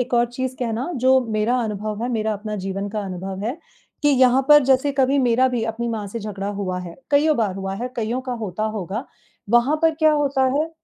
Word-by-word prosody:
एक 250 0 -1
और 240 0 +4
चीज़ 260 +1 -3
कहना 240 +5 -2
जो 260 0 +6
मेरा 215 +4 +1
अनुभव 215 0 -4
है, 245 - -1
मेरा 220 -1 0
अपना 210 +1 -5
जीवन 195 +1 -3
का 210 +1 -3
अनुभव 190 0 -5
है 270 +7 -3 0.4
कि 295 - +4
यहाँ 260 -1 +4
पर 295 -1 +8
जैसे 265 +2 +3
कभी 270 +1 +2
मेरा 250 0 +3
भी 245 -3 -2
अपनी 230 +1 -3
माँ 220 -3 -3
से 230 - -5
झगड़ा 205 -1 -5
हुआ 185 -2 -2
है, 175 -2 -8 0.2
कइयों 295 +1 +4
बार 210 -5 0
हुआ 195 0 -4
है, 240 +5 -4
कइयों 235 +3 -1
का 255 -1 -5
होता 205 +1 -4
होगा, 205 +6 -4 0.5
वहाँ 240 +6 +4
पर 325 -1 +4
क्या 310 0 +4
होता 280 -2 +1
है 320 +2 -1
235 Hz, 220 wpm, -22 LUFS, 210-265 Hz, 0.5 s, पर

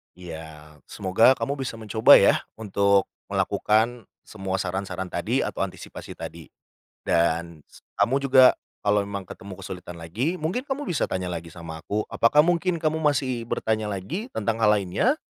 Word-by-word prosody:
Ya. 80 -3 -10
Semoga 110 +8 +3
kamu 140 0 -3
bisa 130 -3 -3
mencoba 110 0 +6
ya, - - +5 0.2
untuk 100 -2 +2 0.2
melakukan 115 +3 0 0.2
semua 95 -3 -4
saran-saran 95 0 -3
tadi - - 0
atau - - -5
antisipasi - - -6
tadi. - - -8 0.5
Dan 85 -2 0 0.3
kamu 130 - +2
juga 130 -1 +8 0.3
kalau 105 0 +3
memang 100 -1 -5
ketemu 95 +1 -10
kesulitan 90 -2 -8
lagi, 115 - -2
mungkin 175 +11 -2
kamu 285 +1 -4
bisa 165 - -1
tanya 90 -1 -3
lagi 85 0 -6
sama 80 -1 -9
aku. 105 +5 -2
Apakah 150 +7 +4
mungkin 175 0 +1
kamu 160 0 -1
masih 135 -5 +1
bertanya 110 -1 -1
lagi 140 - -4
tentang 115 - -2
hal 105 - +5
lainnya? 105 - +1
105 Hz, 150 wpm, -25 LUFS, 90-130 Hz, 0.5 s, juga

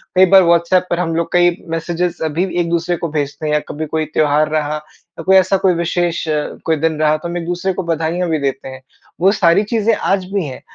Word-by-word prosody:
कई 185 +1 +7
बार 190 -1 +8
व्हाट्सएप 170 +2 +2
पर 175 - -1
हम 165 -2 -1
लोग 170 0 -2
कई 175 -1 +4
मेसेज़स 170 +1 -2
अभी 170 +5 0
एक 170 -1 0
दूसरे 170 +1 0
को 170 - -3
भेजते 145 +2 -3
हैं 150 - 0
या 150 - +3
कभी 155 +2 -4
कोई 155 +1 -2
त्योहार 150 0 +2
रहा 150 0 -2 0.4
या - - -5
कोई 190 +3 +4
ऐसा 190 +1 +4
कोई 190 -1 +2
विशेष 170 0 -1 0.4
कोई 160 - +2
दिन 160 0 -1
रहा 155 0 +3
तो 165 - -7
हम 175 +1 -4
एक 170 - -4
दूसरे 175 +2 -2
को 190 - -4
बधाईयाँ 170 +1 -1
भी 160 -1 0
देते 135 -1 -3
हैं। 130 0 -10 0.4
वो 190 +2 +5
सारी 170 0 +3
चीज़ें 220 +1 +1
आज 195 -1 0
भी 195 -4 0
हैं 130 -3 -8
170 Hz, 235 wpm, -17 LUFS, 155-180 Hz, 0.4 s, बार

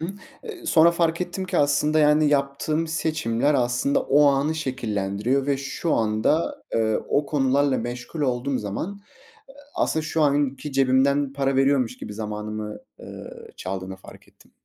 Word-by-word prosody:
Imm, 195 +5 -5 0.3
eee, 390 -7 -9
sonra 170 - +6
fark 170 -1 0
ettim 180 +1 -3
ki 180 -1 -1
aslında, 145 +2 +2
yani, 150 0 +4
yaptığım 145 +3 0
seçimler 155 -4 0
aslında 125 +2 +1
o 145 +1 +4
anı 140 +3 +2
şekillendiriyor 120 -2 -1
ve 140 -1 +1
şu 140 +4 -2
anda, 110 +9 0
eee, 110 -1 +2
o 145 0 +1
konularla 140 -1 +2
meşgul 125 +6 -6
olduğum 130 -1 0
zaman 160 - -5 0.7
aslında 160 - 0
şu 160 +1 -1
anki 145 0 0
cebimden 135 +1 +2
para 135 -1 0
veriyormuş 135 -3 +2
gibi 105 - -7
zamanımı, 105 0 -5 0.2
eee, - - -10 0.3
çaldığını 95 0 -5
fark 95 - -15
ettim. - - -24
140 Hz, 145 wpm, -24 LUFS, 120-155 Hz, 0.7 s, sonra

